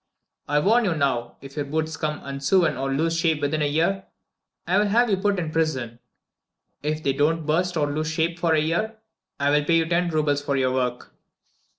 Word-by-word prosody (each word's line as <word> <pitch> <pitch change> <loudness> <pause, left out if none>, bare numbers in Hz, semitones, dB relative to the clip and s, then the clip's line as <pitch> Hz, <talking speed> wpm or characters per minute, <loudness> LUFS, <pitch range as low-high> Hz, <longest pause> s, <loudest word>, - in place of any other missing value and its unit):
I 145 - +2
warn 225 +9 +3
you 175 -5 +1
now 130 -5 -1
if 135 0 -11
your 145 -2 -2
boots 160 +2 -2
become 155 -1 -3
unsewn 140 +4 +1
or 135 +1 -2
lose 165 +4 0
shape 165 -2 +1
within 150 +1 -1
a 150 - +2
year, 170 +6 0 0.6
I 185 +3 +2
will 210 - +2
have 235 +2 +3
you 195 - +3
put 200 +1 0
in 165 -3 -3
prison. 130 -8 -1 0.8
If 155 +1 -2
they 135 - +1
don't 155 +3 +1
burst 175 +3 0
or 150 - +2
lose 155 +2 -2
shape 165 +2 -1
for 165 -2 +2
a - - +3
year 175 +9 -1 0.4
I 140 0 +2
will 150 0 +3
pay 165 +3 +2
you 165 - +2
ten 175 +1 +1
roubles 150 -3 +1
for 140 -1 -1
your 130 -1 +1
work." 125 -1 -2
155 Hz, 210 wpm, -24 LUFS, 145-170 Hz, 0.8 s, warn